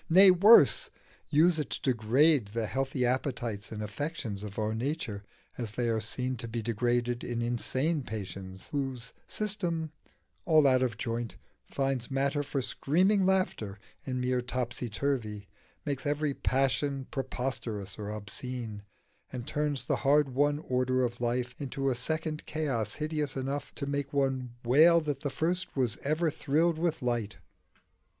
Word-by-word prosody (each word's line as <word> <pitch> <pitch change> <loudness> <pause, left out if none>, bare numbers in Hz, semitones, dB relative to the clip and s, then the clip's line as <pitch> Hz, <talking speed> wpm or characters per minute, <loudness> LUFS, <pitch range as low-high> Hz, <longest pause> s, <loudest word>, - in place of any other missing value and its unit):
nay, 190 +3 +9
worse 215 - +7 0.4
use 160 +2 +4
it 150 - -2
to - - -3
degrade 125 +3 +3
the 110 +2 -2
healthy 135 +1 -1
appetites 120 -4 -2
and 105 -1 -4
affections 105 -1 -4
of 105 -1 -7
our 110 0 0
nature 115 -4 -3 0.4
as 115 -4 -3
they 120 +1 -1
are 110 -1 +1
seen 125 +4 -2
to 115 - -4
be 115 +1 -3
degraded 120 +2 0
in 120 -1 -3
insane 130 +6 +1
patients 95 -4 -7
whose 135 -4 -3
system, 175 -7 -2 0.5
all 155 -3 +5
out 130 -2 +5
of 120 -4 0
joint, 115 -1 -3 0.3
finds 135 -3 -1
matter 140 +2 +1
for 140 -2 -2
screaming 185 +10 +2
laughter 185 - 0 0.3
in 130 -1 -3
mere 125 0 +1
topsy 125 -1 -3
turvy, 110 -4 -2 0.4
makes 140 -1 -2
every 145 0 0
passion 135 +1 0
preposterous 125 -7 -4
or 105 -1 -4
obscene, 105 +1 -5 0.5
and 125 -2 -5
turns 150 -4 -1
the - - +1
hard 145 +1 +3
won 145 +2 +2
order 130 0 +1
of 120 0 -2
life 125 +1 -1
into 135 0 -1
a - - +2
second 155 +5 -2
chaos 130 -9 -1
hideous 150 -3 -2
enough 135 +2 -3
to 140 - -3
make 140 0 -2
one 130 -3 0
wail 160 +8 +7
that 145 -4 -3
the 145 - -2
first 175 +6 -1
was 120 -8 +1
ever 155 +3 0
thrilled 160 +4 +1
with 160 -4 0
light? 120 -4 -1
130 Hz, 150 wpm, -30 LUFS, 120-150 Hz, 0.5 s, nay